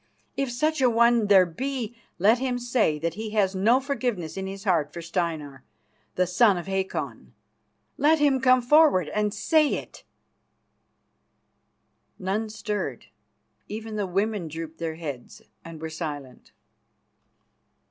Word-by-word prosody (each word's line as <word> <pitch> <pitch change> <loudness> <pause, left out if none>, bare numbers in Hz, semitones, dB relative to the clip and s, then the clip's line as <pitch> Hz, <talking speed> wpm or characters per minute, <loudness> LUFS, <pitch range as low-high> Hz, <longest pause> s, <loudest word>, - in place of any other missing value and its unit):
If 275 -2 -1
such 305 +4 0
a 255 - +5
one 235 -1 +3
there 195 -2 +6
be, 240 +5 -4 0.2
let 215 +6 +4
him 255 -1 -1
say 240 -10 +1
that 165 +2 -2
he 220 +3 -5
has 195 -2 +3
no 220 +7 +3
forgiveness 245 - -3
in 190 0 -4
his 195 +1 -7
heart 165 -7 +1
for 170 - -8
Steinar, 160 -6 -3 0.5
the 185 - +2
son 190 +2 +4
of 175 - -5
Hakon. 190 0 -4 0.7
Let 305 +3 +4
him 285 -3 +2
come 255 -1 +4
forward 270 - +4
and 210 0 0
say 300 +8 +2
it." - - -9 2.1
None 200 +4 -2
stirred; 210 -1 -4 0.6
even 220 +1 -6
the 205 -2 -1
women 195 0 -1
drooped 160 +1 -7
their 165 -1 -3
heads 145 -7 -8 0.2
and 165 -1 -10
were 160 - -5
silent. 145 -6 -7
205 Hz, 135 wpm, -25 LUFS, 170-245 Hz, 2.1 s, there